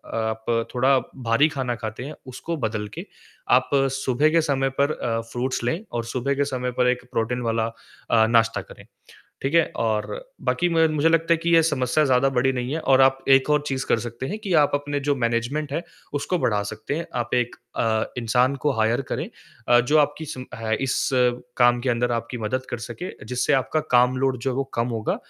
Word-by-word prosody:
आप 110 0 -2
आप 115 -1 +1
थोड़ा 130 +2 +4 0.3
भारी 115 +7 +4
खाना 130 -4 -2
खाते 110 +1 -6
हैं 150 +1 -7
उसको 160 +6 -5
बदल 110 -4 -2
के - - -5 0.5
आप 130 - -12 0.2
सुबह 135 +2 +1
के 165 0 +4
समय 135 -3 0
पर 140 +2 +3
अ, 115 -5 -2
फ्रूट्स 120 +2 -3
लें 160 +9 0
और 115 -1 -2
सुबह 130 +3 -1
के 140 0 +1
समय 125 -2 -3
पर 125 - +4
एक 125 0 -4
प्रोटीन 125 +1 -1
वाला 115 -1 0 0.5
अ, 110 -1 +5
नाश्ता 115 -1 +2
करें, - - -14 0.6
ठीक 135 +4 -1
है? 165 - +5
और 110 -2 0 0.4
बाकी 175 - +1
म 165 -1 +4
मुझे 155 +3 +3
लगता 165 0 +3
है - - +1
कि 170 - +1
ये 165 - +7
समस्या 150 -2 +1
ज़्यादा 130 +1 +3
बड़ी 130 0 +2
नहीं 125 +2 -3
है 160 - -1
और 135 -3 +4
आप 135 0 +3
एक 135 +2 +5
और 150 0 +2
चीज़ 135 -1 -2
कर 115 - +2
सकते 120 +2 -6
हैं 210 - -4
कि 200 -4 -3
आप - - 0
अपने 145 0 -2
जो 145 0 +1
मैनेजमेंट 125 +5 -1
है 170 - -2 0.3
उसको 145 +6 -1
बढ़ा 105 -8 +1
सकते 110 +7 -5
हैं 165 - -3
आप 120 +1 -3
1 120 -1 0 0.2
अ, 110 -1 +1
इंसान 125 +3 +2
को 145 +1 0
हायर 115 +4 +2
करें - - -2 0.4
अ, 120 0 +7
जो 150 +6 +2
आपकी 145 +2 0
सिम 130 -3 -7
है 110 -1 -1
इस 130 - 0 0.5
काम 120 -1 +5
के 130 - -1
अंदर 120 0 +1
आपकी 115 +1 -3
मदद 130 +4 -2
कर - - -2
सके 180 +10 -6
जिससे 125 +4 0
आपका 135 +4 +1
काम 125 +1 +4
लोड 130 -1 +1
जो 135 - -1
है - - -4
वो 135 - +1
कम 115 +1 +1
होगा, 115 -3 -1
130 Hz, 215 wpm, -23 LUFS, 115-145 Hz, 0.6 s, ये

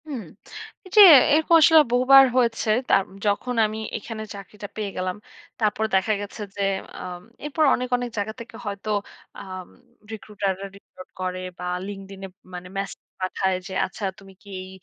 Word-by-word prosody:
হুম। 265 -7 -5 0.6
এই - - -12
যে 425 - +10 0.3
এরকম 320 +2 +3
আসলে 320 +1 +7
বহুবার 265 +2 +7
হয়েছে। 235 -3 +1 0.2
তাম 195 - +4 0.2
যখন 210 +5 0
আমি 215 +1 -4 0.2
এখানে 220 0 -7
চাকরিটা 200 +1 -9
পেয়ে 210 -2 -3
গেলাম। 185 +1 -2 0.4
তারপর 215 0 +1
দেখা 190 +3 +2
গেছে 205 +2 -8
যে 200 - -4 0.4
আম 180 -1 -7 0.2
এরপর 300 +2 0
অনেক, 250 - -3
অনেক 245 0 -4
জায়গা 205 +1 -2
থেকে 235 +2 -10
হয়তো 200 +1 -5 0.5
আম 185 -2 -8 0.4
recruiter 210 -2 -3
রা - - -5
recruit 185 -2 -15
করে 185 0 -3 0.2
বা 180 - -7 0.2
LinkedIn 195 -1 -9
এ - - -6 0.3
মানে 180 0 -7
মেসেজ 195 0 -4 0.2
পাঠায় 185 0 0
যে 190 - -8
আচ্ছা 190 +3 -10 0.2
তুমি 195 0 -15
কি 205 - -16
এই 185 - -10
205 Hz, 165 wpm, -24 LUFS, 190-235 Hz, 0.6 s, যে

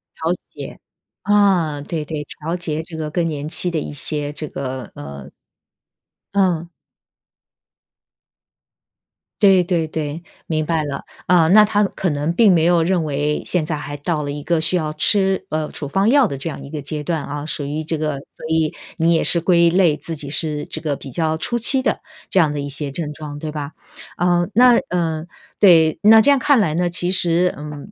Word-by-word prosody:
调 - - -1
节， - - -10 0.4
啊， 185 -8 +2
对 155 +1 -4
对， 150 -1 -5 0.2
调 165 +3 -3
节 160 -3 -3
这 160 -1 -10
个 155 -1 -4
更 170 +1 0
年 150 -2 -4
期 180 +3 +1
的 160 - -1
一 - - -6
些 145 +1 -2
这 155 0 -6
个， 130 -3 -6
呃 70 -1 -9 1.1
嗯。 175 -4 +1 2.7
对 195 -3 +6
对 170 -2 0
对， 155 +1 -5 0.2
明 155 -1 -1
白 160 -1 0
了， 140 -2 -5 0.2
呃， 175 -3 +4
那 210 +3 +7
他 210 0 +2
可 190 -2 -2
能 150 +2 -1
并 210 +3 +5
没 160 - +2
有 175 -1 +3
认 175 0 +1
为 150 0 -2
现 180 -3 +1
在 155 - -1
还 145 0 -6
到 150 +1 -2
了 145 - -4
一 145 0 -6
个 170 +2 0
需 160 +3 +3
要 155 -3 -1
吃， 190 +3 +2
呃， 155 -1 -2
处 145 - -6
方 195 +8 +1
药 280 +1 +5
的 140 -10 -4
这 165 - -3
样 - - -8
一 140 - -11
个 150 -2 -5
阶 150 +1 -5
段 160 -1 -2
啊， 145 +1 -6
属 155 -1 -3
于 150 +3 -4
这 160 0 -3
个 150 -3 -2
所 - - -12
以 160 -1 +1 0.2
你 165 +1 +3
也 165 - +2
是 170 - +4
归 170 0 +3
类 175 -3 +3
自 165 +2 -6
己 145 -2 -7
是 150 -2 +2
这 160 - -5
个 150 -3 -2
比 135 -1 -10
较 160 +1 -1
初 240 +8 -2
期 260 +3 +3
的 - - 0 0.3
这 190 - +3
样 160 -4 +3
的 145 - -4
一 140 - -4
些 140 0 -3
症 150 0 -5
状， 150 -1 -8
对 155 0 -5
吧？ 150 -1 -6 0.4
呃， 175 0 +2
那 245 0 +6
呃， 165 -3 -2 0.3
对， 165 -5 +5
那 220 +2 +7
这 235 +6 +5
样 280 - +3
看 280 -1 +3
来 160 -8 +1
呢， 175 +1 0
其 175 +1 -1
实， 180 -1 +3
嗯， 150 +6 -9
160 Hz, 215 characters per minute, -19 LUFS, 150-180 Hz, 2.7 s, 那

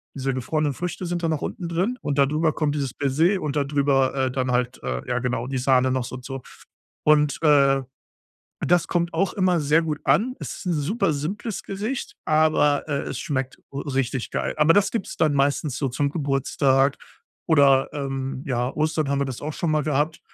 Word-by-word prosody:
Diese 135 0 -1
gefrorenen 145 +3 -1
Früchte 180 +4 -4
sind 175 0 -3
dann 165 - +1
noch 155 - -2
unten 175 -2 -4
drin 185 +9 -1
und 145 -1 -2
dadrüber 155 +3 +2
kommt 150 -2 -1
dieses 140 -4 -2
Baiser 160 +8 +1
und 150 -1 -3
dadrüber, 140 -2 +2
äh, 130 -1 +1
dann 130 -1 -1
halt, 125 +1 -1
äh, 65 -1 -4
ja 125 - +1
genau, 125 -1 -2
die 135 0 -2
Sahne 130 0 +3
noch 130 -1 0
so 130 - -7
und 125 - -10
so. 135 0 -5 0.6
Und, 150 -2 +4
äh, 140 -3 +4 0.8
das 175 0 +3
kommt 170 -1 -1
auch 185 +3 +1
immer 185 -3 +2
sehr 150 +2 +3
gut 155 -2 -3
an. 250 +4 +2
Es - - -5
ist - - -10
'n 175 - +1
super 165 +4 0
simples 195 +9 -4
Gericht, 215 +7 -4
aber, 155 -2 +3
äh, 140 -2 0
es - - -5
schmeckt 130 -2 -3 0.2
r 140 0 -5
richtig 135 -1 -1
geil. - - -2
Aber 155 +2 +5
das 205 -1 +3
gibt's 225 -5 -3
dann 155 -2 +2
meistens 140 0 +1
so 140 - 0
zum 140 +3 -1
Geburtstag 135 -2 +1 0.5
oder, 140 -4 +5
ähm, 135 -2 -4
ja, 125 -1 0
Ostern 155 -1 0
haben 140 0 +1
wir - - +2
das 130 -3 -6
auch 150 +1 -4
schon 170 - -1
mal 155 -1 +2
gehabt. 150 +2 0
145 Hz, 200 wpm, -24 LUFS, 135-160 Hz, 0.8 s, Aber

